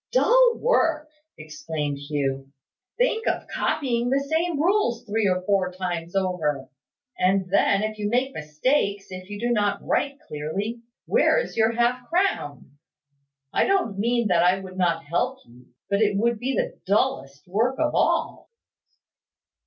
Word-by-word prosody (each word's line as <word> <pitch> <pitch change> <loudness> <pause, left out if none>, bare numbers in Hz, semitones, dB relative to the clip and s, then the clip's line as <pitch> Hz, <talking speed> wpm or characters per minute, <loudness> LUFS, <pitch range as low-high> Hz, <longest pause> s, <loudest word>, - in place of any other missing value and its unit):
"Dull - - +5
work!" 325 -10 +1 0.3
exclaimed 155 -2 -4
Hugh. 135 -2 -3 0.5
"Think 480 -2 +1
of - - 0
copying 245 -4 -1
the 270 +2 +2
same 320 +3 -1
rules 315 - +1
three 215 -1 0
or 185 0 0
four 190 -2 +1
times 175 -1 -4
over! 160 -8 -1 0.5
And 190 0 +2
then, 200 +1 +3
if 215 0 -4
you 205 0 -1
make 255 +4 0
mistakes, 200 - -1
if 185 +1 -8
you 205 0 -6
do 240 +2 -1
not 205 -3 0
write 280 -1 0
clearly, 195 +11 -4 0.2
where - - +3
is - - -2
your 225 +1 +2
half 240 +1 0
crown? 145 - -1 0.7
I - - +3
don't 370 - 0
mean 235 +1 +1
that 175 -2 +4
I 180 +2 +3
would 190 -1 -10
not 170 -3 +1
help 170 +4 -1
you, 120 +1 -19 0.2
but 200 +1 0
it 205 -2 +2
would 235 +1 +1
be 260 +2 -2
the - - -2
dullest 140 -8 0
work 225 +8 +1
of 310 -1 0
all." - - 0
205 Hz, 155 wpm, -24 LUFS, 170-250 Hz, 0.7 s, Dull